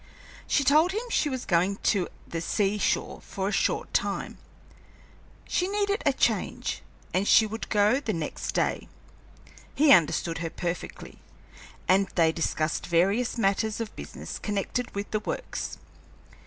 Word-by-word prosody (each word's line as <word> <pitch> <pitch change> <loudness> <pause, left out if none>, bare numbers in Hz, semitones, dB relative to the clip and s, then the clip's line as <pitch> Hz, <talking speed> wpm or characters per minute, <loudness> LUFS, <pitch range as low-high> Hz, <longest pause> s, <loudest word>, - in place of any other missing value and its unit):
She 285 - +2
told 310 +7 +4
him 465 +4 -3
she 300 - +2
was 260 -2 -4
going 180 +2 +2
to 190 -4 +2 0.2
the 165 - -4
sea 205 +4 0
shore - - 0
for 195 0 -4
a - - 0
short - - 0
time; - - -1 1.1
she 360 - 0
needed 405 +1 0
a - - +6
change, - - -1 0.3
and 190 +2 +1
she 220 - +7
would 220 +1 -6
go 210 +4 +3
the 255 -6 -2
next 165 -6 -4
day. - - 0 0.9
He 295 0 +5
understood 165 - +4
her 165 0 -3
perfectly, 175 +1 -5 0.7
and 195 +1 +4
they 165 -2 +4
discussed 160 -1 -1
various 195 +9 +2
matters 215 +1 +1
of 225 -1 -5
business - - -7
connected 210 +4 -2
with 200 0 -4
the 215 - +1
Works. - - -4
205 Hz, 145 wpm, -27 LUFS, 180-250 Hz, 1.1 s, she